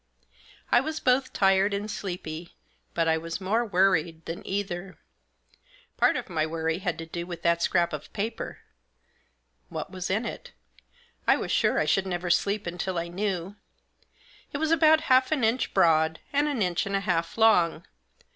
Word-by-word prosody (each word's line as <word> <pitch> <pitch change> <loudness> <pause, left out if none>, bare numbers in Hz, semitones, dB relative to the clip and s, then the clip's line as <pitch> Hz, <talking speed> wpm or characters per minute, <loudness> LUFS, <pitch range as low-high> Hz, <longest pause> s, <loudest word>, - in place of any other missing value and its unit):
I - - +6
was 315 +3 -4
both 260 +1 +2
tired 195 +1 +3
and 200 +1 -3
sleepy, 175 -5 -6 0.4
but 165 -1 +1
I 160 0 +2
was 165 +2 -5
more 210 +5 +1
worried 175 -6 +1
than 165 - -5
either. 190 -2 -4 1.0
Part - - +3
of - - -5
my 165 -5 -1
worry 160 +1 -1
had 180 -4 -2
to 165 - -6
do 170 +1 -6
with 175 -2 -7
that 170 0 +2
scrap 170 -2 +2
of 150 0 -6
paper. 220 +3 -4 1.1
What 195 - -5
was 185 -2 -5
in 215 +5 0
it? - - -7 0.7
I - - +5
was - - -4
sure - - +2
I - - +2
should 195 0 +1
never 175 -1 -2
sleep 200 +4 +1
until 175 +1 -3
I 170 0 -2
knew. 190 +1 -3 0.9
It - - -3
was 315 +2 0
about 315 -1 +5
half 260 -3 +3
an 290 -6 +1
inch 225 +3 +1
broad, 160 -3 +3
and 290 +1 +2
an 270 -8 0
inch 180 +1 0
and 195 - -1
a 195 - +1
half 170 -3 -1
long. 180 -7 +4
190 Hz, 175 wpm, -27 LUFS, 170-220 Hz, 1.1 s, I